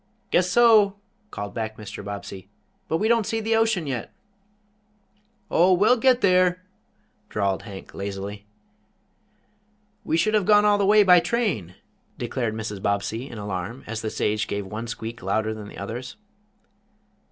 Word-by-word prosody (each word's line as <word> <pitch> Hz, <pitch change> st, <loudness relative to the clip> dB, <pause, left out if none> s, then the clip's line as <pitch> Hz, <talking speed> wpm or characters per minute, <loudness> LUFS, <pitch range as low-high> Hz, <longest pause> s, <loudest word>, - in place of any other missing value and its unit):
"Guess 180 Hz, 0 st, +3 dB
so," 215 Hz, -2 st, +5 dB, 0.3 s
called 100 Hz, -, -6 dB
back 110 Hz, -1 st, -4 dB
Mr. 105 Hz, -1 st, -8 dB
Bobbsey, 100 Hz, -1 st, -7 dB, 0.4 s
"but 160 Hz, -, 0 dB
we 215 Hz, -, 0 dB
don't 230 Hz, -2 st, +2 dB
see 225 Hz, -, -1 dB
the 225 Hz, +1 st, 0 dB
ocean 225 Hz, -6 st, +2 dB
yet." 130 Hz, -5 st, -4 dB, 1.4 s
"Oh, 180 Hz, +3 st, +5 dB
we'll 210 Hz, +7 st, +4 dB
get 250 Hz, +1 st, +3 dB
there," 185 Hz, -1 st, +3 dB, 0.7 s
drawled 100 Hz, -2 st, -1 dB
Hank, 100 Hz, -3 st, -10 dB
lazily. 100 Hz, +1 st, -6 dB, 1.6 s
"We 160 Hz, -, 0 dB
should 215 Hz, +6 st, +1 dB
have 210 Hz, -4 st, +2 dB
gone 210 Hz, -1 st, +6 dB
all 205 Hz, -1 st, +4 dB
the 200 Hz, -, +2 dB
way 210 Hz, 0 st, +6 dB
by 180 Hz, -2 st, +7 dB
train," 170 Hz, -, -1 dB, 0.4 s
declared 120 Hz, -2 st, -2 dB
Mrs. 110 Hz, -3 st, -5 dB
Bobbsey, 100 Hz, +6 st, -2 dB
in 115 Hz, -, -9 dB
alarm, 105 Hz, +4 st, -5 dB
as 115 Hz, +1 st, -5 dB
the 110 Hz, -, -3 dB
stage 105 Hz, 0 st, -1 dB
gave 100 Hz, -1 st, -3 dB
one 110 Hz, +4 st, -6 dB
squeak 115 Hz, 0 st, -6 dB
louder 110 Hz, +3 st, -1 dB
than 105 Hz, -1 st, -8 dB
the -, -, -11 dB
others. 115 Hz, +6 st, -6 dB
115 Hz, 150 wpm, -24 LUFS, -, 1.6 s, by